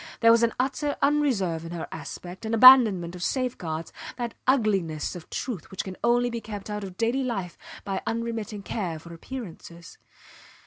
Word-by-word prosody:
There 230 0 +7
was 230 0 +5
an 235 -1 +2
utter 275 +3 0
unreserve 245 - +1
in 165 +1 -7
her 170 - -5
aspect, 180 +3 -8
an 225 +1 -1
abandonment 220 -8 +8
of 180 - -9
safeguards, 175 - -2 0.2
that 240 -2 -3
ugliness 195 - +1
of 175 - -10
truth 225 - -5
which 190 - -4
can 190 -1 -7
only 240 +1 +3
be 235 0 -4
kept 210 -1 -7
out 210 0 -3
of 185 -2 -8
daily 235 +4 +1
life 195 -9 -3 0.3
by 195 -2 -3
unremitting 225 -3 -3
care 180 -8 -3
for 170 +2 -11
appearances. 170 -4 -9
215 Hz, 170 wpm, -26 LUFS, 175-240 Hz, 0.3 s, abandonment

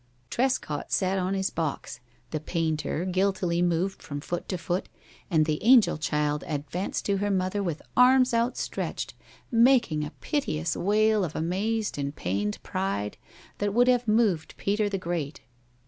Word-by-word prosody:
Trescott 245 - -1
sat 190 0 +1
on 185 +1 0
his 190 0 -1
box, 155 -6 -3 0.3
the 155 - -1
painter 160 +1 -1
guiltily 185 -2 +1
moved 180 +2 0
from 145 -1 -5
foot 175 +4 -5
to 185 - -1
foot, 175 +2 -2 0.4
and 160 -4 +3
the 150 -1 -1
angel 235 - +6
child 150 -1 0
advanced 155 +5 -3
to 200 -1 +1
her 205 +1 0
mother 190 +1 0
with 170 -6 -3
arms 255 0 +5
outstretched, 235 +2 -2 0.4
making 235 - +4
a 150 - -4
piteous 165 - -1
wail 215 +2 +3
of 165 -4 -4
amazed 200 +4 -1
and 140 +1 -3
pained 100 +3 -2
pride 185 - -2 0.4
that 205 0 -1
would 245 +1 +5
have 245 -1 +3
moved 210 -7 +1
Peter 205 +1 0
the 200 - -1
Great. 165 -5 -4
185 Hz, 150 wpm, -27 LUFS, 155-210 Hz, 0.4 s, angel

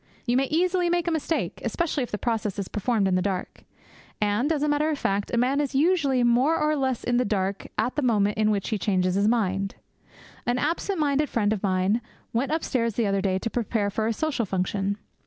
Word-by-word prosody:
You 240 - +1
may 270 +1 +3
easily 350 +4 +1
make 345 0 0
a - - +2
mistake, 320 0 -2
especially 335 -5 -1
if 245 - -3
the 210 - -3
process 220 -3 -2
is 200 -2 -3
performed 210 -1 0
in 190 - +1
the 185 - +2
dark. 185 -1 -4 0.5
And, 210 +8 +1
as 300 -2 0
a - - +2
matter 295 +1 +2
of 305 - -1
fact, 200 -5 -1
a 235 - 0
man 260 +4 +2
is 280 -2 -3
usually 285 -5 +3
more 250 +7 +3
or 305 0 +1
less 265 -4 -1
in 245 0 +1
the 250 - +3
dark 195 -3 -2
at 250 - 0
the 295 - 0
moment 210 -5 +2
in 215 0 +3
which 200 -2 0
he 215 -3 -1
changes 185 -2 +1
his 200 +2 +2
mind. 195 -4 0 0.7
An 245 +1 +2
absent 335 +8 -1
minded 295 0 +1
friend 215 -2 +1
of 205 - -4
mine 190 +3 +1 0.3
went 255 +5 0
upstairs 250 -8 0
the 235 - +1
other 195 -1 +1
day 190 -1 +1
to 230 - -3
prepare 220 -3 -1
for 220 +2 -1
a - - +1
social 270 -4 -1
function. 195 +2 -1
235 Hz, 225 wpm, -25 LUFS, 200-290 Hz, 0.7 s, may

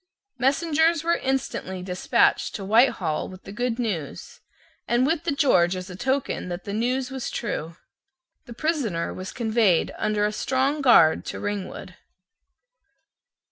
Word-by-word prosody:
Messengers 320 +4 +2
were 340 +1 +2
instantly 245 -8 -3
despatched 180 -1 +1
to 195 - -5
Whitehall 200 - +2
with 185 0 -12
the - - -9
good 235 +2 -2
news, 195 - -4 0.5
and 240 +2 +2
with 325 +3 0
the 335 - +1
George 190 - +3
as 185 +1 -7
a - - -7
token 260 -3 -2
that 175 +1 -5
the 200 - -5
news 250 +4 -1
was 265 -2 -4
true. 165 -8 -4 0.7
The 240 - -8
prisoner 240 - -1
was 185 +1 -7
conveyed 220 -6 +2
under 210 -1 +1
a 210 - 0
strong 265 +6 0
guard 230 - +5
to - - -5
Ringwood. 200 -3 -5
230 Hz, 140 wpm, -24 LUFS, 185-270 Hz, 0.7 s, guard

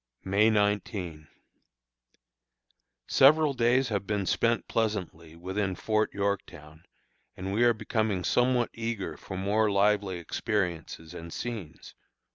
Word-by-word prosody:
May 100 +3 +3
19. 100 -7 -1 1.8
Several 150 +2 +5
days 125 +1 +2
have 100 -3 -2
been 105 -2 -1
spent 115 +5 +1
pleasantly 90 -8 -2
within 95 +2 -2
Fort 110 +4 0
Yorktown, 90 -5 -4 0.5
and 95 +1 -4
we 115 +4 +2
are 120 0 +5
becoming 110 -3 -1
somewhat 125 +2 +2
eager 115 -3 -4
for 95 - -8
more 105 +3 +1
lively 100 -1 +2
experiences 85 - -3
and 85 0 -8
scenes. 110 -9 -6
105 Hz, 110 wpm, -28 LUFS, 90-115 Hz, 1.8 s, Several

